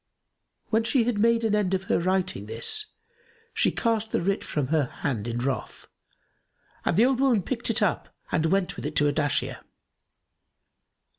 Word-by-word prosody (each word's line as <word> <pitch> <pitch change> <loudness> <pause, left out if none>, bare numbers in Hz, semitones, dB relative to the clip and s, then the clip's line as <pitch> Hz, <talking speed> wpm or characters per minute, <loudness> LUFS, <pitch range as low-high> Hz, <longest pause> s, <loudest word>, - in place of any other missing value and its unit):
When 225 0 +3
she 235 +1 +3
had 225 -3 -1
made 230 +1 +3
an 220 -2 +1
end 200 -3 +2
of 190 - -3
her - - +1
writing 185 - -1
this, 115 - -1 0.7
she - - +2
cast 225 -2 -1
the - - +1
writ 195 +3 -1
from 145 -4 -2
her 155 -2 +2
hand 120 -3 -4
in 120 0 -3
wrath, 130 +2 -3 1.0
and - - 0
the 225 - +6
old 260 -1 +1
woman 255 -8 +3
picked 240 +2 -2
it 230 -1 +2
up 190 - 0 0.2
and 160 - +1
went 190 +2 0
with - - -4
it 155 - -6
to 145 - +3
Ardashir. 145 -1 0
190 Hz, 170 wpm, -26 LUFS, 150-230 Hz, 1.0 s, the